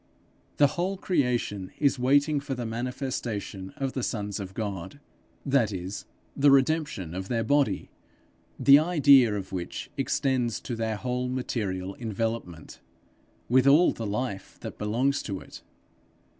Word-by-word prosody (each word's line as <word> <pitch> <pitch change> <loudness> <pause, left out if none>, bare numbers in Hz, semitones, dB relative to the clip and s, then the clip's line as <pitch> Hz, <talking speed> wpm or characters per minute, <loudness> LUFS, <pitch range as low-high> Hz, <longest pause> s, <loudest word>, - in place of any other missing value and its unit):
The 145 - +6
whole 180 +7 -1
creation 125 - -1
is 140 -3 +2
waiting 145 +4 +3
for 140 -1 -4
the 120 -1 -4
manifestation 115 -5 -4
of 135 -1 -2
the 130 - -2
sons 105 -4 -3
of 95 -1 -7
God 105 +4 -5 0.5
that 135 -6 +2
is, 95 +1 -5 0.3
the 140 +1 +5
redemption 135 - +2
of 95 +1 -5
their 115 0 0
body, 145 +5 +1 0.7
the 140 +1 +8
idea 140 -9 +5
of 100 -2 -5
which 90 -2 -5
extends 125 -5 0
to 120 - -4
their 110 -1 -2
whole 125 +2 -2
material 100 -7 -3
envelopment, 110 -7 -4 0.7
with 130 +2 +4
all 150 +6 +6
the 115 - -5
life 105 -1 -4
that - - -8
belongs 130 +7 +1
to 100 -3 -4
it. - - -12
120 Hz, 140 wpm, -27 LUFS, 105-140 Hz, 0.7 s, the